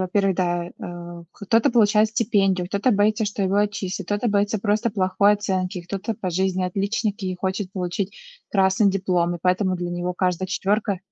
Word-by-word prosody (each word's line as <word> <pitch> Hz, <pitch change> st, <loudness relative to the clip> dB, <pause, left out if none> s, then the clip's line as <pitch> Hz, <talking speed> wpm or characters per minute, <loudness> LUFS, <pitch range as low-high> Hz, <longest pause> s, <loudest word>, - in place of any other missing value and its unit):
во-первых, 190 Hz, +1 st, +1 dB
да, 175 Hz, -2 st, 0 dB
э, 175 Hz, -1 st, -8 dB
кто-то 225 Hz, +3 st, +2 dB
получает 215 Hz, -2 st, +4 dB
стипендию, 200 Hz, -5 st, +1 dB
кто-то 200 Hz, +6 st, +1 dB
боится, 210 Hz, +2 st, +2 dB
что 205 Hz, 0 st, -2 dB
его 190 Hz, 0 st, 0 dB
отчислят, 200 Hz, -2 st, -1 dB
кто-то 205 Hz, +3 st, 0 dB
боится 205 Hz, +1 st, +1 dB
просто 215 Hz, +3 st, +1 dB
плохой 200 Hz, 0 st, +3 dB
оценки, 185 Hz, -3 st, -2 dB
кто-то 200 Hz, +5 st, -4 dB
по 190 Hz, -, -4 dB
жизни 185 Hz, +1 st, 0 dB
отличник 200 Hz, +3 st, -2 dB
и 185 Hz, -1 st, -2 dB
хочет 190 Hz, +1 st, -3 dB
получить 185 Hz, +1 st, -3 dB, 0.3 s
красный 195 Hz, +1 st, +3 dB
диплом, 180 Hz, -3 st, 0 dB
и -, -, -14 dB
поэтому 185 Hz, +1 st, +1 dB
для 175 Hz, 0 st, -4 dB
него 175 Hz, +1 st, -2 dB
каждая 185 Hz, 0 st, -1 dB
четвёрка 200 Hz, +1 st, 0 dB
195 Hz, 165 wpm, -23 LUFS, 185-205 Hz, 0.3 s, получает